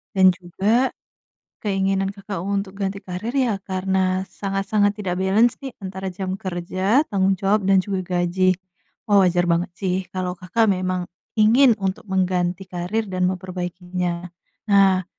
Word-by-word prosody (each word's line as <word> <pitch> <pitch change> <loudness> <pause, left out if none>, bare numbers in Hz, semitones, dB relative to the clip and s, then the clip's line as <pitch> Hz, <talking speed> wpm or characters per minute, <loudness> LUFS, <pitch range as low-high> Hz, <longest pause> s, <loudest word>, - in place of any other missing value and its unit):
dan 190 - +5
juga, 200 +9 +1 0.8
keinginan 195 -1 +1
Kakak 200 -2 -6
untuk 200 -1 -2
ganti 195 0 -2
karir 185 +5 -5
ya 245 -5 +2
karena 190 0 0
sangat-sangat 200 +1 0
tidak 185 -4 -2
balance 215 +5 +4
nih 270 -1 -5
antara 190 0 -5
jam 185 +1 -4
kerja, 190 - 0
tanggung 190 -1 +1
jawab 200 +2 +2
dan 195 - +6
juga 190 0 -2 0.2
gaji. 185 +1 +2 0.5
Wah, 205 -1 +5
wajar 175 0 +2
banget 170 +1 +1
sih 185 -2 0
kalau 185 -1 -3
Kakak 185 +6 0
memang 185 -2 0 0.3
ingin 230 +2 +6
untuk 190 -1 -2
mengganti 185 -1 0
karir 185 +5 -2
dan 185 -1 +1
memperbaikinya. 180 -1 -4 0.4
Nah, 195 -2 +4
190 Hz, 140 wpm, -22 LUFS, 180-200 Hz, 0.8 s, dan